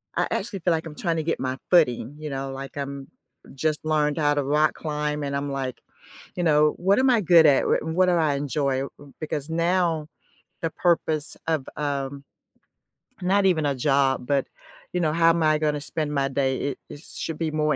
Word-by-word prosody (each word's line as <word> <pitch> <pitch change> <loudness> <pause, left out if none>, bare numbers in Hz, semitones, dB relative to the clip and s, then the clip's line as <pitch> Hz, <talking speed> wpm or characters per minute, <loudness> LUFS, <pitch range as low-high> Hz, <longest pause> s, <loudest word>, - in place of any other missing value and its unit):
I - - +2
actually 195 - -2
feel 175 0 +1
like 160 0 -2
I'm 150 - -8
trying 165 0 -1
to 160 - -1
get 165 - -1
my 130 0 -2
footing, 145 -6 +3
you 155 0 -6
know, 135 -1 -4
like 135 +1 -8
I'm 140 -1 -5 0.5
just 155 +2 -1
learned 150 -1 +1
how 145 -2 +2
to 145 -1 0
rock 150 +3 +2
climb 150 -1 -3
and 140 0 -2
I'm 140 0 -2
like, 135 -2 -4 0.5
you 180 - -3
know, 150 -2 +4
"What 195 +3 +3
am 265 +1 +3
I 235 - +4
good 170 -4 +6
at? 140 -2 +4
R - - +2
what 165 +4 +1
do 180 - +3
I 160 -4 +2
enjoy?" 140 -1 -1 0.4
Because 150 -1 -4
now 170 -2 +1 0.5
the 165 - 0
purpose 160 -3 0
of, 160 -5 0
um 140 -1 -3 1.0
not 195 +2 +2
even 165 -5 +2
a 140 -1 +1
job, 135 -1 +1
but, 140 0 0 0.5
you 180 - 0
know, 155 -2 +2
how 165 0 +4
am 165 -1 0
I 155 0 +4
gonna 150 -1 -1
spend 150 0 -3
my 135 -1 +1
day, 135 -1 0
it - - -10
it 145 - -10
should 165 -1 -6
be 160 -1 -2
more 150 0 +1
150 Hz, 205 wpm, -24 LUFS, 140-165 Hz, 1.0 s, good